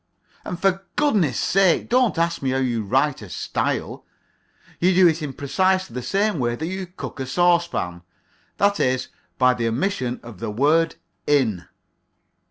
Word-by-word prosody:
And 180 - -5
for 195 0 +1
goodness 210 - +2
sake 190 -2 +2
don't 245 -6 +2
ask 170 0 0
me 135 - -1
how 130 - 0
you 120 -4 0
write 135 +7 +1
a 105 - -10
style. - - -3 0.8
You 180 +1 +3
do 185 -1 +7
it 165 0 +1
in 150 -2 -3
precisely 185 +4 0
the 125 - -4
same 200 - 0
way 120 -1 0
that 160 - -4
you 190 +2 -4
cook 175 -5 -8
a 130 - -3
saucepan 170 - +1 0.6
that 200 0 +2
is, 130 0 0 0.3
by 125 -1 +4
the 120 -2 -2
omission 125 - -1
of 115 -6 -11
the - - -4
word 150 +9 +2 0.3
"in." 115 -12 +1
150 Hz, 165 wpm, -22 LUFS, 125-185 Hz, 0.8 s, do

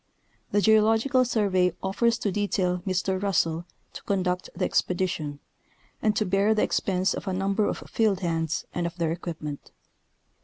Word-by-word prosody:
The 205 - +3
Geological 225 +5 +4
Survey 190 -7 +2
offers 230 +5 +1
to 205 - -1
detail 185 -3 0
Mr. 185 0 0
Russell 170 -4 0 0.3
to - - -8
conduct 180 -2 -1
the - - 0
expedition, 175 -6 -1 0.6
and 215 -1 +2
to 215 - +1
bear 200 +3 +2
the 210 - +2
expense 190 0 +1
of - - -6
a 190 - 0
number 195 +2 +1
of - - -3
field 210 -4 +1
hands 165 -3 -1
and 175 -1 -1
of 170 +1 -9
their 165 -2 0
equipment. 160 -4 -6
190 Hz, 155 wpm, -26 LUFS, 175-205 Hz, 0.6 s, Geological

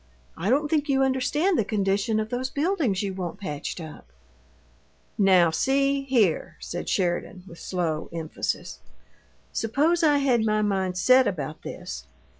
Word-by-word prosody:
"I 185 +5 -2
don't 290 +4 +2
think 300 -1 0
you 270 -1 +3
understand 285 +7 +1
the - - +3
condition 200 +1 0
of 215 0 -3
those 255 +1 -2
buildings 285 - 0
you 195 -1 -2
want 185 0 -5
patched 150 -3 -5
up." 155 - -10 1.1
"Now, 185 -4 +5
see 275 +7 +1
here," 230 -11 +1
said 175 - -5
Sheridan, 180 0 -1
with 170 - -12
slow 165 -4 -2
emphasis; 165 -2 -4 0.7
"suppose 300 +10 +1
I 300 -3 +4
had 255 -5 +2
my 215 -1 +1
mind 190 -3 -1
set 255 +6 +5
about 155 -4 -4
this. 65 +1 -7
215 Hz, 145 wpm, -25 LUFS, 180-270 Hz, 1.1 s, Now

